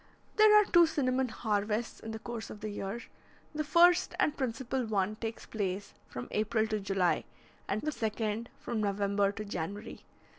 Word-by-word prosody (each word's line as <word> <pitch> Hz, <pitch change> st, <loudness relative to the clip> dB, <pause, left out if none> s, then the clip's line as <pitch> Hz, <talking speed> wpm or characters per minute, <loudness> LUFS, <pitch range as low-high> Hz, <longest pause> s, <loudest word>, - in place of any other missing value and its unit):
There 425 Hz, 0 st, +8 dB
are 420 Hz, -, +4 dB
two 345 Hz, -3 st, +6 dB
cinnamon 260 Hz, -4 st, +1 dB
harvests 215 Hz, 0 st, -1 dB
in 225 Hz, -, -8 dB
the 220 Hz, -, -4 dB
course 230 Hz, 0 st, -6 dB
of 210 Hz, -, -9 dB
the 215 Hz, -, -3 dB
year. 205 Hz, +3 st, -4 dB, 0.5 s
The 305 Hz, 0 st, -1 dB
first 345 Hz, +3 st, +5 dB
and 300 Hz, -, +2 dB
principal 260 Hz, 0 st, -2 dB
one 205 Hz, -1 st, 0 dB
takes 225 Hz, 0 st, -5 dB
place 200 Hz, -2 st, -3 dB, 0.2 s
from 120 Hz, -, -6 dB
April 215 Hz, +1 st, +1 dB
to 215 Hz, -1 st, 0 dB
July, 195 Hz, -3 st, +1 dB, 0.4 s
and 210 Hz, +2 st, -1 dB
the 305 Hz, -, 0 dB
second 220 Hz, -2 st, -2 dB
from 230 Hz, -3 st, -2 dB
November 200 Hz, 0 st, +1 dB
to 215 Hz, +1 st, -6 dB
January. 200 Hz, +3 st, -5 dB
220 Hz, 170 wpm, -31 LUFS, 205-255 Hz, 0.5 s, There